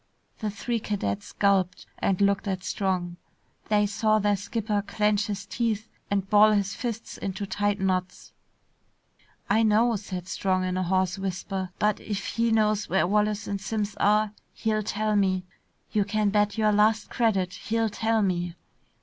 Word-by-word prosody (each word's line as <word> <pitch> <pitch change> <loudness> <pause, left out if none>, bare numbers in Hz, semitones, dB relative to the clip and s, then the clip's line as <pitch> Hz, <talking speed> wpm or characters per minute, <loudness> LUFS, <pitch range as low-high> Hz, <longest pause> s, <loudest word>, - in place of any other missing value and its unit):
The 215 - -2
three 230 +3 -2
cadets 105 - -3
gulped 190 -3 +1
and 190 -2 +1
looked 200 0 +2
at 185 -2 -2
Strong. 180 -4 -2 0.5
They 210 -1 +4
saw 215 +1 +2
their 205 -1 +2
skipper 205 +1 -2
clench 210 0 +1
his 200 -2 -4
teeth 220 0 -1 0.2
and 195 -1 0
ball 210 +1 +6
his 200 -1 +1
fists 230 -2 -5
into 195 +1 -3
tight 205 +1 0
knots. 185 -1 -2 1.1
"I 215 +3 +3
know," 225 +2 +3
said 185 -3 -6
Strong 185 -1 0
in 185 0 -1
a 185 - 0
hoarse 185 +1 0
whisper, 190 0 -3
"but 210 0 +1
if 205 -1 -4
he 230 0 0
knows 215 -1 +2
where 190 -1 +3
Wallace 210 +2 +1
and 200 -1 -3
Simms 205 0 -2
are, 210 +1 +3 0.2
he'll 215 -1 0
tell 215 0 -1
me. 190 -2 +2 0.5
You 210 -2 +2
can 205 0 0
bet 210 +1 +1
your 215 -1 +3
last 215 +1 +2
credit, 195 -7 +1
he'll 225 0 -1
tell 225 +1 +1
me!" 175 -2 -1
205 Hz, 160 wpm, -26 LUFS, 190-215 Hz, 1.1 s, ball